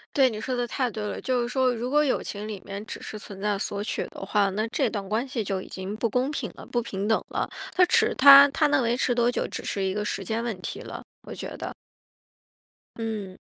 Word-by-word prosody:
对， 270 -2 +5
你 215 -3 -5
说 255 +3 -2
的 245 0 0
太 250 +1 -1
对 215 -1 -5
了， 210 - -3
就 255 -1 0
是 235 - -1
说 255 -1 +2
如 240 +2 -3
果 295 +2 +4
友 285 -4 +1
情 210 +1 -5
里 215 - -5
面， 200 +1 -6
只 - - -7
是 215 - -7
存 200 -2 -10
在 205 -1 0
索 200 +1 -3
取 - - -3
的 - - -10
话， 200 0 +2
那 215 +3 -1
这 260 0 +1
段 200 -2 -4
关 230 +5 0
系 255 -4 -2
就 195 -2 -2
已 - - -10
经 190 +2 -6
不 230 0 0
公 255 +5 0
平 245 -8 -3
了、 - - -11
不 240 - -1
平 195 -3 -4
等 220 +1 +2
了， - - -1 0.3
它 365 -1 +6
持 450 +4 +3
它 280 +1 +10
它 300 +2 +3
能 285 - +3
维 235 0 +1
持 250 0 +1
多 240 0 +3
久， 245 - -1
只 - - -6
是 195 - -2
一 190 - 0
个 210 +1 -2
时 195 -1 -2
间 220 +4 -2
问 235 -4 -3
题 - - -5
了， - - -8 0.2
我 - - -8
觉 - - -6
得。 - - -5 1.2
嗯。 210 -5 -4
225 Hz, 275 characters per minute, -26 LUFS, 205-255 Hz, 1.2 s, 它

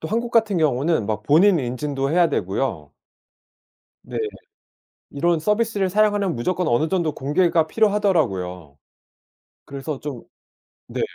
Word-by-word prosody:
또 160 - -5
한국 235 +4 -1
같은 220 -5 +2
경우는 145 -4 +1
막 105 -1 -2
본인 170 - +4
인증도 135 +2 -2
해야 170 0 +4
되고요 - - -2 1.1
네. - - -8 0.9
이런 165 +3 0
서비스를 210 0 0
사용하면 205 -4 +1
무조건 180 +8 -1
어느 150 +6 +2
정도 170 -6 0
공개가 160 +3 +1
필요하더라고요. 125 - 0 0.9
그래서 140 +1 -6
좀 140 -6 -6 0.7
네. - - -4
160 Hz, 280 characters per minute, -22 LUFS, 135-195 Hz, 1.1 s, 본인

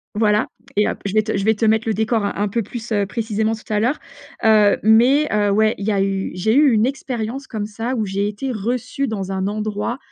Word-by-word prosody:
voilà, 210 0 +2 0.3
et 210 +1 +3
hop, - - -4
je 200 - -2
vais 215 0 +3
te 220 - -2
je 195 - -1
vais 220 0 +3
te 225 - 0
mettre 220 +1 +2
le 220 - +1
décor 220 0 0
un 200 - -2
un 205 +1 0
peu 230 +4 -1
plus, 230 +2 -8
heu, 205 -2 +1
précisément 220 0 -1
tout 220 - -14
à 210 - +2
l'heure. 245 +7 0 0.4
Heu, 215 -2 +5
mais 245 +8 +4
heu, 205 -1 +2
ouais, 215 +2 +2
il 200 - -5
y 215 - +1
a 195 - +1
eu 195 0 -1
j'ai 210 +5 +1
eu 290 -1 +5
une 215 0 +3
expérience 260 -1 -4
comme 215 -3 -4
ça 225 +4 -4
où 220 -3 -1
j'ai 200 +1 -1
été 210 +6 -4
reçue 245 +5 -2
dans 195 -3 -4
un 190 0 -2
endroit, 215 +3 -3
220 Hz, 250 wpm, -20 LUFS, 205-230 Hz, 0.4 s, Heu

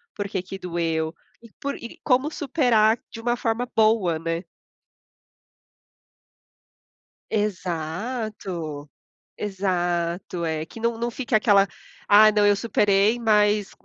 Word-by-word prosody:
por 205 - -3
que 195 -2 -3
que 190 +1 -8
doeu 165 -3 -2 0.3
e 230 - -15
por 280 0 -2
e 235 - -10
como 265 +3 +2
superar 245 -8 +2
de 225 - -8
uma 240 +1 0
forma 230 +1 -1
boa, 215 -6 +3
né? 165 +2 -3 2.9
Exato. 180 - -3 0.5
Exato, 175 -3 -2
é. 160 -1 -2
Que - - -12
não 230 0 -1
não 235 +1 -1
fique 245 0 -4
aquela: 205 -2 +5 0.4
"Ah, 215 +1 +7
não, 210 -1 +3
eu 205 - +5
superei." 205 0 +2
Mas 210 -3 +2
205 Hz, 115 wpm, -24 LUFS, 175-230 Hz, 2.9 s, Ah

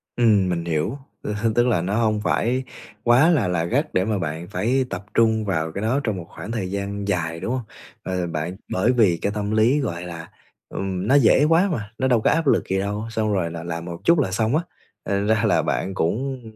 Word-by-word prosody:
Ừm, 105 -6 +3
mình 85 -1 -2
hiểu, 80 - -1 0.2
ơ, 105 - -3
h 110 +2 -1
tức 120 +1 +3
là 105 -8 +2
nó 95 +4 -1
hông 110 -2 +1
phải 125 +4 0 0.4
quá 125 +8 +5
là 140 - +3
là 85 -2 0
gắt 145 - -1
để 95 +1 +2
mà 110 -2 0
bạn 80 +1 -4
phải 125 +5 0
tập 100 - -5
trung 110 -1 +3
vào 80 -4 -1
cái 100 - -5
đó 120 +6 +1
trong 110 -4 -1
một 85 - -6
khoảng 110 - -8
thời 95 -5 -3
gian 100 0 -3
dài, 85 -3 -1
đúng 115 - -3
hông? 130 -2 -2 0.4
Ờ, 90 -2 -2
bạn, 85 +3 -3 0.2
bởi 105 +7 +2
vì 105 -9 +3
cái 100 - 0
tâm 105 0 -2
lý, 115 +7 +3
gọi 85 -9 -3
là, 85 -2 -8 0.4
ừm, 95 0 -3
nó 135 - +4
dễ 135 +1 +5
quá 175 +4 +4
mà, 105 -6 -4
nó 130 - +1
đâu 120 -4 +3
có - - +3
áp 165 -3 +1
lực - - +2
gì 95 0 +1
đâu, 105 +2 -2
xong 110 -2 0
rồi 85 -4 0
là 85 0 -6
làm 85 0 -5
một 85 -1 -6
chút 170 -2 +4
là 110 -9 0
xong 110 +7 +1
á, 165 - +1 0.4
thành 100 +1 -1
ra 110 -1 +2
là - - +3
bạn 95 - -2
cũng 125 +10 -1
105 Hz, 240 wpm, -23 LUFS, 90-120 Hz, 0.4 s, quá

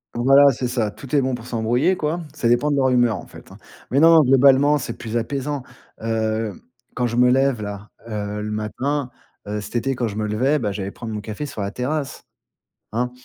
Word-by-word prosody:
Voilà, 135 +4 +6
c'est 125 0 -3
ça. 120 -4 -1
Tout 135 +6 -6
est 140 - +4
bon 130 0 -1
pour 120 -1 -6
s'embrouiller 125 +10 +1
quoi. 155 +2 -2
Ça 125 - 0
dépend 120 +5 +3
de 145 - +1
leur 135 -2 +3
humeur, 120 -4 +3
en - - -9
fait, - - -15
hein. - - -12 0.3
Mais 135 - +2
non, 165 +1 +7
non, 160 - +8
globalement, 135 +2 +5
c'est 140 - -4
plus 115 0 -3
apaisant. 140 +3 -3 0.4
Heu, 110 -2 -2 0.3
quand 125 -1 0
je 120 - -4
me 125 +1 +5
lève 135 -4 +2
là, 105 0 -7 0.2
heu, 105 -1 -4
le 105 - -4
matin, 130 +6 -2 0.4
heu, 105 +1 -3
cet 105 - -9
été 135 +3 -1
quand 120 -1 -1
je 100 - -6
me 105 0 -2
levais, 130 +8 +1
bah, 105 -5 -1
j'allais 100 0 -4
prendre 115 +1 -7
mon 105 - -4
café 110 +7 -5
sur 110 - -6
la 100 0 -3
terrasse, 140 +4 -3 0.7
hein. 125 +3 -1
125 Hz, 220 wpm, -21 LUFS, 110-140 Hz, 0.7 s, non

